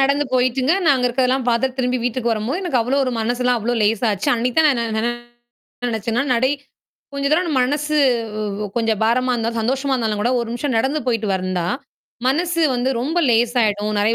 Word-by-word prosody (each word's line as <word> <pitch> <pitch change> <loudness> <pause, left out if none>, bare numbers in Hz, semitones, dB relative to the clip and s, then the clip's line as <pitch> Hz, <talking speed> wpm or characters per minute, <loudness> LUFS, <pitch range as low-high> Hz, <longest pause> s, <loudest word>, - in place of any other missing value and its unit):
நடந்து 280 +2 +2
போயிட்டுங்க. 255 +3 +2
நான் 285 -4 +5
அங்க 250 - +1
இருக்கதெல்லாம் 255 +1 0
பார்த்து 250 +2 0
திரும்பி 250 0 0
வீட்டுக்கு 245 -1 -1
வரம்போது, 230 - -2
எனக்கு 320 -9 0
அவ்வளோ 260 +5 0
ஒரு 255 - -1
மனசுலாம் 245 +2 0
அவ்ளோ 240 +3 -1
லேசா 220 +3 +1
ஆச்சு. 195 - -2
அன்னைக்கு 240 +1 -2
தான் 315 - +6
நான் 275 - +2
என்ன 230 -1 -2
நன 235 - +1 0.8
நெனச்சேன்னா 230 +1 -1
நடை 255 +3 +2 0.6
கொஞ்ச 280 0 -2
தரம் 355 +4 +3
நம்ம 295 -5 0
மனசு 295 +3 -1 0.8
கொஞ்சம் 225 -2 +1
பாரமா 250 +3 +2
இருந்தா 230 -1 -1
சந்தோஷமா 265 +4 -1
இருந்தாலும் 220 -4 -1
கூட 240 - +1
1 235 - -3
நிமிஷம் 250 +2 -2
நடந்து 270 +7 0
போயிட்டு 225 -3 0
வந்தா, 185 -2 -2 0.6
மனசு 335 +5 +1
வந்து 245 +2 0
ரொம்ப 310 +8 -1
லேசாயிடும். 225 -3 +1
நெறைய 215 +3 +2
245 Hz, 180 wpm, -20 LUFS, 225-270 Hz, 0.8 s, தான்